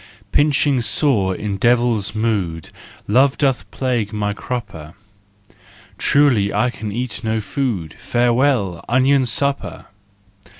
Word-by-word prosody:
Pinching 145 -1 +2
sore, 110 -8 +1
in 100 0 -4
devil's 120 -2 +1
mood, 100 -8 -2 0.4
Love 130 +6 +3
doth 130 -9 0
plague 120 -4 -2
my 105 -1 -2
crupper: 100 -10 -6 1.0
Truly 125 -9 +3
I 125 0 +1
can 110 -3 -6
eat 120 +1 -4
no 110 0 0
food: 100 - -3
Farewell, 120 -6 +1
onion 130 +2 +3
supper! 140 +4 -2
115 Hz, 110 wpm, -19 LUFS, 100-130 Hz, 1.0 s, Love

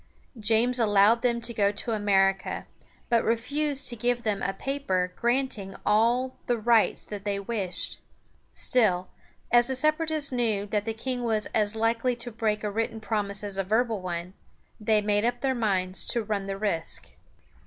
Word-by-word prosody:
James 230 +4 +2
allowed 210 +1 +4
them 235 -1 +1
to 235 +1 -4
go 205 -2 +2
to 210 +3 -4
America, 195 -3 +1 0.4
but 230 -1 +3
refused 275 +5 0
to 240 - 0
give 240 +1 0
them 210 -3 -1
a - - 0
paper 195 -6 -2
granting 240 -5 -1
all 235 +5 +2
the 240 - +2
rights 230 0 +2
they 205 -1 -3
wished. 200 -3 -3 0.5
Still, 185 -7 +1 0.4
as 240 0 +6
the 265 - 0
Separatists 310 +1 +1
knew 225 -5 0
that 210 0 -1
the 225 -1 -3
king 250 +2 -3
was 220 -2 0
as 210 0 +1
likely 230 +2 +1
to 240 +1 -6
break 215 -1 -1
a 210 - -1
written 225 +1 -2
promise 210 -2 -2
as 200 -1 -3
a 195 - +1
verbal 220 +1 +1
one, 175 0 -4 0.5
they 215 0 +2
made 205 0 +1
up 240 +1 0
their 270 -1 +1
minds 190 -6 -1
to 235 - 0
run 205 -2 -2
the 195 0 -3
risk. 185 -6 -2
220 Hz, 165 wpm, -27 LUFS, 200-240 Hz, 0.5 s, as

